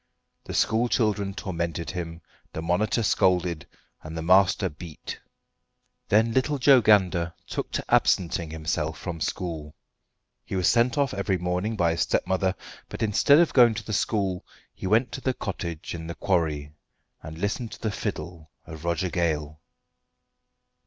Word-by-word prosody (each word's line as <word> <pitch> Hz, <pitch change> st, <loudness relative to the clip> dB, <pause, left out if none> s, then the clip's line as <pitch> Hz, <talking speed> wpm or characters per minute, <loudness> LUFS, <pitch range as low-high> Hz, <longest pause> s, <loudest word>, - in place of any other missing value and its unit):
The -, -, -6 dB
school 115 Hz, +2 st, +2 dB
children 105 Hz, -4 st, 0 dB
tormented 85 Hz, -4 st, -3 dB
him, 85 Hz, -2 st, -6 dB, 0.3 s
the 80 Hz, -, -4 dB
monitor 100 Hz, +7 st, +1 dB
scolded, 90 Hz, -5 st, +1 dB, 0.3 s
and 80 Hz, +1 st, -8 dB
the 80 Hz, -, -3 dB
master 95 Hz, +2 st, +4 dB
beat. 75 Hz, +1 st, -8 dB, 0.9 s
Then 110 Hz, +2 st, +3 dB
little 135 Hz, +4 st, +1 dB
Joe 135 Hz, -1 st, +6 dB
Gander 90 Hz, -5 st, +3 dB
took -, -, -4 dB
to -, -, -2 dB
absenting 85 Hz, -2 st, +2 dB
himself 80 Hz, 0 st, -2 dB
from 85 Hz, -3 st, -6 dB
school. 80 Hz, -3 st, -4 dB, 0.7 s
He -, -, -5 dB
was 90 Hz, -2 st, +2 dB
sent 120 Hz, +2 st, +3 dB
off 140 Hz, -2 st, +1 dB
every 100 Hz, -1 st, 0 dB
morning 90 Hz, +5 st, -2 dB
by 85 Hz, -5 st, +2 dB
his 85 Hz, -, -1 dB
stepmother, 95 Hz, 0 st, +1 dB, 0.3 s
but -, -, -4 dB
instead 110 Hz, +7 st, +5 dB
of 170 Hz, 0 st, +3 dB
going 120 Hz, -4 st, +6 dB
to 110 Hz, -, -5 dB
the 105 Hz, -, -5 dB
school 100 Hz, -3 st, 0 dB, 0.3 s
he -, -, -6 dB
went 115 Hz, +5 st, +2 dB
to 135 Hz, -, -6 dB
the 130 Hz, -1 st, -1 dB
cottage 85 Hz, -5 st, -5 dB
in 80 Hz, -1 st, -6 dB
the 85 Hz, -, -5 dB
quarry, 75 Hz, -6 st, 0 dB, 0.5 s
and 80 Hz, 0 st, -9 dB
listened 105 Hz, +5 st, -2 dB
to -, -, -10 dB
the 110 Hz, -, -1 dB
fiddle 85 Hz, -4 st, -5 dB, 0.2 s
of 80 Hz, 0 st, -10 dB
Roger 85 Hz, +1 st, -1 dB
Gale. 75 Hz, -4 st, -1 dB
90 Hz, 155 wpm, -26 LUFS, 85-110 Hz, 0.9 s, Joe